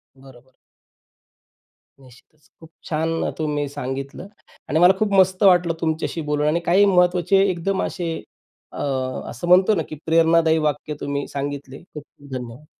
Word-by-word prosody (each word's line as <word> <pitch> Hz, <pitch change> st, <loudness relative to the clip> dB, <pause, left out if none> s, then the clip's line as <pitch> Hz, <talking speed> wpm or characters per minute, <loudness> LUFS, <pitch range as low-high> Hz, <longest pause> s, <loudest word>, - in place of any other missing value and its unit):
बरोबर. 130 Hz, -1 st, -18 dB, 1.5 s
निश्चितच 135 Hz, +4 st, -21 dB
खूप 160 Hz, -1 st, -15 dB, 0.2 s
छान 165 Hz, +1 st, -1 dB
तुम्ही 150 Hz, -2 st, -2 dB
सांगितलं 135 Hz, +6 st, -6 dB, 0.4 s
आणि 155 Hz, -, +1 dB
मला 180 Hz, +2 st, +7 dB
खूप 215 Hz, -2 st, 0 dB
मस्त 190 Hz, 0 st, +3 dB
वाटलं 175 Hz, -3 st, +4 dB
तुमच्याशी 160 Hz, 0 st, -2 dB
बोलून 150 Hz, 0 st, +1 dB
आणि 165 Hz, +3 st, +1 dB
काही 190 Hz, +4 st, +4 dB
महत्त्वाचे 180 Hz, 0 st, +3 dB
एकदम 185 Hz, +2 st, -1 dB
असे 170 Hz, -3 st, -3 dB, 0.6 s
अ, -, -, -7 dB, 0.6 s
म्हणतो 185 Hz, +4 st, +5 dB
ना 165 Hz, -, -1 dB
की 155 Hz, -, -6 dB
प्रेरणादायी 165 Hz, 0 st, +3 dB
वाक्य 150 Hz, 0 st, -2 dB
तुम्ही 140 Hz, 0 st, -3 dB
सांगितले. 140 Hz, -1 st, -6 dB
खूप 150 Hz, -5 st, -11 dB
खूप 145 Hz, -1 st, -20 dB
धन्यवाद. 125 Hz, +2 st, -7 dB
160 Hz, 135 wpm, -21 LUFS, 145-180 Hz, 1.5 s, मला